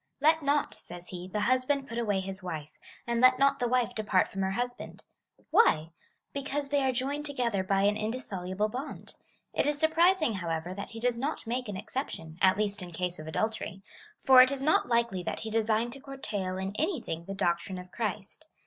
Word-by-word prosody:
Let 315 +3 +4
not, 285 0 +1
says 175 0 -9
he, 180 0 -6
the 210 +3 -2
husband 260 +3 +1
put 230 +1 -4
away 205 -4 +1
his 190 0 -6
wife, 155 -5 -5 0.3
and 235 0 0
let 255 0 +7
not 275 +1 +3
the 245 - +1
wife 250 0 +1
depart 200 -4 +2
from 195 - -4
her 190 - +1
husband. 245 +3 -4 0.5
Why? 160 - +4 0.4
Because 280 0 -3
they 285 -1 +2
are 265 - +3
joined 280 +4 -2
to 285 - -5
gether 235 -7 0
by 195 +1 +2
an 205 +1 +3
indissoluble 210 -4 -2
bond. 255 +7 -5 0.4
It - - +1
is 295 0 +1
surprising, 320 -2 +3
however, 170 -2 -3
that 200 +1 -6
he 225 - -8
does 240 0 0
not 285 +5 -2
make 245 0 -2
an 200 - -4
exception, 190 - -5
at 190 +1 +5
least 205 -1 -1
in 180 -1 -7
case 180 +1 -3
of 155 - -8
adultery; 195 +3 -2 0.3
for 260 -1 +8
it 255 +1 +6
is 275 -1 -2
not 300 -4 +3
likely 235 -5 +1
that - - -3
he 220 - -4
designed 225 +1 +1
to 275 - -9
curtail 210 -9 -4
in 190 +2 -4
anything 295 - -2
the 195 - -5
doctrine 175 0 0
of 180 0 -9
Christ. 215 - -4
220 Hz, 205 wpm, -29 LUFS, 190-265 Hz, 0.5 s, for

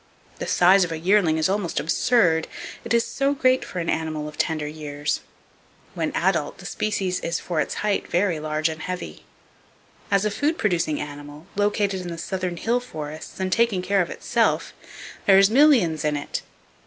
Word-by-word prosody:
The - - -4
size 185 +2 +5
of 175 - -3
a 165 - -2
yearling 175 -1 +3
is 160 - +2
almost 195 -3 -1
absurd, 165 -1 +2 0.4
it - - -8
is 235 -1 +3
so 275 +4 0
great 255 -1 +3
for - - -8
an 170 -1 -2
animal 155 -2 -2
of 150 - -9
tender 155 0 -1
years. 150 -1 -3 0.7
When - - -2
adult, - - 0
the - - -12
species 195 -4 -1
is 170 - -2
for 165 -4 -1
its - - -3
height 205 -1 0
very 175 -2 +1
large 155 0 0
and 160 0 -5
heavy. 180 - -6 0.8
As 200 +1 +2
a 210 - +1
food 300 +9 0
producing 170 -7 0
animal, 145 +1 -8
located 205 -1 +1
in 180 - -7
the 170 -1 -5
southern 185 0 -3
hill 235 +7 +1
forests 155 -10 -8
and 190 0 -1
taking 220 -4 +2
care 195 +1 +2
of 175 - -2
itself, - - 0 0.5
"there's 195 +1 +6
millions 230 - +4
in 150 -1 +1
it!" 145 - -4
180 Hz, 180 wpm, -24 LUFS, 155-205 Hz, 0.8 s, there's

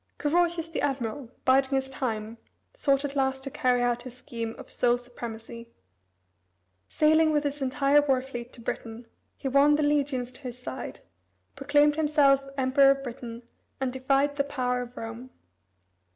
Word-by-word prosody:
Carausius 340 +2 +1
the 330 - -3
admiral, 260 -2 -2 0.2
biding 265 +1 +4
his 265 0 0
time, 230 -4 -4 0.3
sought 280 - +1
at 285 0 -5
last 265 -1 0
to 275 - -5
carry 250 -1 +1
out 245 0 +1
his 250 0 -10
scheme 230 -4 -5
of 265 - -11
sole 245 0 +2
supremacy. 235 -1 -9 1.2
Sailing 315 +1 +4
with 300 -1 +1
his 290 0 -3
entire 275 +2 +3
war 270 -3 +2
fleet 245 -2 -7
to 235 - -10
Britain, 230 0 -5 0.3
he - - -4
won 280 +2 +5
the 300 - +1
legions 280 -4 0
to 255 - -14
his 250 -3 -7
side, 250 - -7 0.5
proclaimed 290 +2 +3
himself 290 -3 +4
Emperor 270 +1 +5
of 275 0 +2
Britain, 235 -2 -7 0.4
and 260 -2 -1
defied 275 +2 +1
the 280 - +2
power 250 -3 -1
of 245 0 -9
Rome. 230 +3 -7
265 Hz, 160 wpm, -27 LUFS, 245-285 Hz, 1.2 s, won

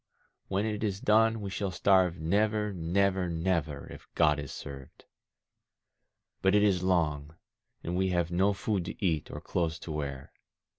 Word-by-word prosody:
When 100 +2 0
it 105 -1 -2
is 100 -3 -1
done 110 +1 +3
we 100 -1 -5
shall 100 0 -2
starve 95 -1 +3
never, 105 +5 +1
never, 95 +2 +1
never, 80 -4 -1
if - - -13
God 75 -3 +3
is 70 -2 -6
served. 70 -2 -10 1.4
But 95 +2 +3
it 105 - +5
is 95 -4 +3
long, 80 -5 0 0.5
and 85 - -3
we 95 +1 +1
have 85 -1 0
no 95 +4 +3
food 100 -1 -1
to 100 - -5
eat, 80 -4 0
or - - -6
clothes 85 -2 -2
to 80 - -8
wear. 70 -3 -5
90 Hz, 160 wpm, -29 LUFS, 80-100 Hz, 1.4 s, it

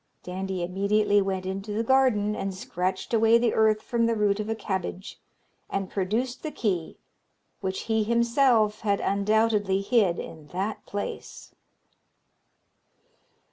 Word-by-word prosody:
Dandie 185 0 -4
immediately 205 +3 +2
went 190 -1 -2
into 195 +2 -4
the 220 +2 0
garden 230 -5 +3
and 195 -2 -3
scratched 190 -2 -3
away 225 0 +5
the 235 -1 +1
earth 215 -1 +3
from 230 -1 +1
the 230 - +1
root 205 -1 +1
of 215 +1 -3
a 225 - 0
cabbage, 190 -2 -4 0.5
and 195 -1 -3
produced 220 +6 -1
the 310 - -4
key, 185 - -2 0.6
which 190 -1 -3
he 220 -1 0
himself 235 -1 +3
had 200 -2 +1
undoubtedly 205 -1 +1
hid 200 -5 +2
in 155 -2 -8
that 195 +6 -4
place. 205 0 -6
210 Hz, 135 wpm, -26 LUFS, 190-225 Hz, 0.6 s, away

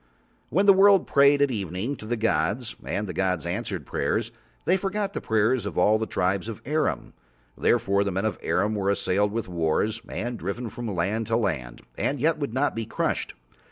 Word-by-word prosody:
When 190 - +2
the 200 - +8
world 195 0 +6
prayed 140 0 +5
at 140 - +1
evening 100 - -3
to 110 - -10
the 120 +1 -1
gods 110 +3 0
and 105 - -2
the 90 - -5
gods 90 -1 0
answered 95 - -3
prayers 115 - -1 0.3
They 185 - +4
forgot 195 +1 -2
the - - -4
prayers 110 +2 +1
of - - -6
all 110 +1 +4
the 110 - -2
Tribes 95 +4 0
of 110 - -6
Arim. 150 +4 -1 0.4
Therefore 100 0 +2
the 100 - -2
men 95 +3 -1
of 110 - -2
Arim 105 +3 +1
were 100 -2 0
assailed 100 +1 +1
with 115 -1 -3
wars 90 +6 0
and 120 +1 -4
driven 110 +6 -4
from 120 +2 -6
land 105 +4 -1
to 115 -1 +2
land 65 - -3 0.2
and 140 - 0
yet 155 +3 +2
would 140 -5 -2
not 135 +4 0
be 115 -1 -3
crushed. - - -2
110 Hz, 195 wpm, -25 LUFS, 95-130 Hz, 0.4 s, the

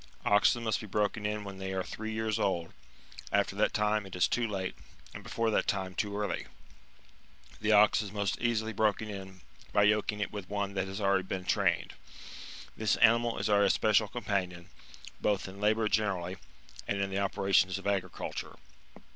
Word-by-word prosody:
Oxen 105 +3 +4
must 110 0 0
be 110 - -8
broken 105 +1 0
in 105 0 -3
when 100 -1 -8
they 95 0 -4
are 95 -1 -1
three 110 +3 -6
years 110 -1 -1
old; 85 -4 -1 0.6
after 100 -1 +1
that 105 - +2
time 105 0 +1
it 95 - -9
is 90 - +3
too 120 -1 0
late, 95 -3 -3 0.4
and - - -8
before 115 -1 -1
that - - +1
time 95 -2 -1
too 100 +1 -2
early. 105 0 -2 1.1
The 110 0 +2
ox 105 +2 +6
is 100 -3 -6
most 100 -2 -1
easily 110 -2 0
broken 110 0 0
in 95 -2 -9 0.3
by 105 - +4
yoking 105 0 +2
it 105 - -2
with 100 -3 -6
one 100 -1 -2
that 95 -1 -1
has 95 +2 -5
already 100 -2 +1
been 95 -1 -4
trained.®^ - - +1 0.8
This 110 -1 +1
animal 115 +1 +4
is - - -1
our 105 -1 +4
espe 100 +2 +3
cial 105 0 +3
companion, 95 -5 -3 0.5
both 100 -2 0
in 95 +1 -10
labour 110 +1 +2
generally, 95 -4 0 0.5
and 100 - -1
in 100 0 -1
the 95 - -1
operations 95 -1 +2
of 100 - -10
agriculture. 95 -3 -3
100 Hz, 180 wpm, -31 LUFS, 95-110 Hz, 1.1 s, ox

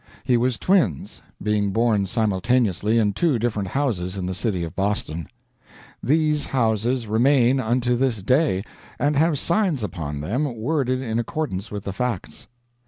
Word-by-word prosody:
He 125 - +2
was 120 0 +1
twins, 165 - +1 0.2
being 105 -1 +1
born 110 -2 +2
simultaneously 110 +1 +1
in 105 -3 +2
two 145 - +1
different 105 -4 -1
houses 100 -7 -1
in 95 - -3
the 95 - -2
city 95 -2 -1
of 80 - -6
Boston. 95 -6 -2 0.7
These 150 0 +1
houses 115 0 0
remain 125 +4 +3
unto 120 0 +1
this 120 -5 0
day, 125 - +2 0.3
and 145 +1 +1
have 155 +1 +3
signs 170 - +1
upon 80 -7 -4
them 125 - -1
worded 130 +1 -1
in 115 -2 -1
accordance 115 - -3
with 100 -2 -6
the 100 - -4
facts. 120 -2 -4
115 Hz, 150 wpm, -23 LUFS, 100-130 Hz, 0.7 s, remain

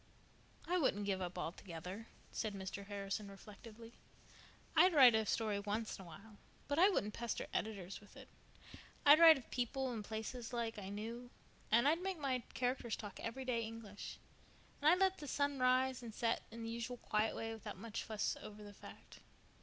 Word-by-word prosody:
"I 360 +1 +2
wouldn't 205 - +1
give 195 -2 0
up 180 0 -4
altogether," 180 +4 -6 0.2
said 215 -3 -2
Mr. 195 +1 -6
Harrison 200 0 -3
reflectively. 220 +3 -12 0.8
"I'd 365 -2 +6
write 255 -5 +9
a 220 -1 +2
story 215 -3 0
once 210 +2 -3
in - - -7
a - - -10
while, 200 +6 -12 0.3
but 285 +2 0
I 375 +3 +8
wouldn't 210 - 0
pester 235 -1 -3
editors 195 -4 -3
with 205 - -16
it. - - -11 0.8
I'd 295 +2 +9
write 325 -2 +10
of 255 - -12
people 255 +1 -1
and 220 -3 -4
places 225 +3 -5
like 230 -2 -2
I 195 -1 -6
knew, 230 +4 -5 0.4
and 235 +5 +5
I'd 325 +4 +3
make 380 -1 -2
my 270 -4 0 0.2
characters 245 -2 0
talk 205 -3 -8
everyday 250 0 -2
English; 220 -2 -7 0.6
and 295 - +6
I'd 350 - +6
let 380 0 +3
the 295 - -7
sun 285 -1 0
rise 255 0 +3
and 230 -3 -8
set 230 -1 +1
in 230 +1 -8
the 225 - -4
usual 235 +1 -4
quiet 215 -1 0
way 225 0 -3
without 220 -2 -7
much 230 -2 -5
fuss 215 -2 -1
over 210 0 -9
the 205 0 -10
fact. - - -13
225 Hz, 185 wpm, -38 LUFS, 205-255 Hz, 0.8 s, write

